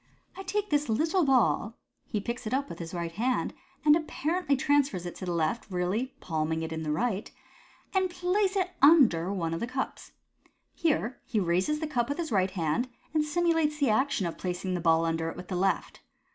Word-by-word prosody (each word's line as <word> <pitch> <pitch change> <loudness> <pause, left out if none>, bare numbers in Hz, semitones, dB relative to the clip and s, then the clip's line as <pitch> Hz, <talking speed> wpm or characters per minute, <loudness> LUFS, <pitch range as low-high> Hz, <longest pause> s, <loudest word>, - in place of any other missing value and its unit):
I - - -7
take 405 +1 -2
this 290 -3 +1
little 320 - +2
ball 245 -4 +2
" - - -50
(he 210 - 0
picks 235 +3 -4
it 250 - 0
up 280 +1 -1
with - - -8
the 170 +1 -5
right 170 -1 -3
hand, 245 +8 0 0.3
and 300 0 +7
apparently 315 -1 0
transfers 275 - +1
it 175 - -5
to 185 - -6
the - - 0
left, 170 +7 -1
really 195 +8 -1
palming 160 -1 -1
it 160 - -4
in 160 - -4
the 155 -1 -2
right), 215 +4 -1 0.3
" - - -29
and 380 -1 +2
place 370 +3 0
it 370 -2 0
under 255 - +6
one 170 -4 -2
of 165 - -2
the 235 - -2
cups." 260 +2 -4 0.6
Here 285 -7 0
he 225 -5 -1
raises 185 - +1
the - - 0
cup 245 -5 -1
with 285 - -2
the 330 -7 -3
right 190 -1 +3
hand, 185 +7 -1 0.2
and 310 -1 +3
simu 335 +3 +1
lates 300 -2 +1
the 280 -6 +2
action 230 -3 +1
of 170 - -4
placing 185 0 -3
the 175 - -1
ball 165 0 +3
under 165 0 -1
it - - -8
with 180 0 -9
the 185 - -2
left. 185 0 0
235 Hz, 215 wpm, -29 LUFS, -, 0.6 s, and